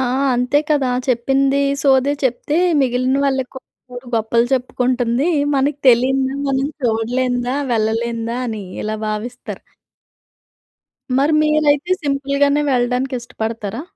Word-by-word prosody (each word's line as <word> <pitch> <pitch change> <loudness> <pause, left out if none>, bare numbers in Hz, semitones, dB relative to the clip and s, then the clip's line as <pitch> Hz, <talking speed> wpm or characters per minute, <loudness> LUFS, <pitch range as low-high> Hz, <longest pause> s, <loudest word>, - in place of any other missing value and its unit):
ఆ! - - +1 0.3
అంతే 250 +4 +2
కదా! 285 -4 +2 0.2
చెప్పింది 270 +3 +2 0.2
సోది 270 0 +3
చెప్తే, 260 +4 -1 0.2
మిగిలిన 255 0 +1
వాళ్ళకి 265 -1 -2 0.6
గొప్పలు 230 +1 +1
చెప్పుకుంటుంది. 250 +1 0 0.3
మనకు 280 +1 0
తెలియనిదా, 265 +2 +2
మనం 270 0 0 0.2
చూడలేందా 245 +2 0 0.2
వెళ్ళలేందా 230 +1 -1
అని, 220 -3 -5 0.2
ఇలా 215 0 -3
భావిస్తారు. 235 +4 -6 1.6
మరి 285 +3 +2
మీరైతే 305 +2 +2
సింపుల్‌గానే 280 0 +1
వెళ్ళడానికి 250 +1 0
ఇష్టపడతారా? 225 0 -5
255 Hz, 100 wpm, -18 LUFS, 235-275 Hz, 1.6 s, సోది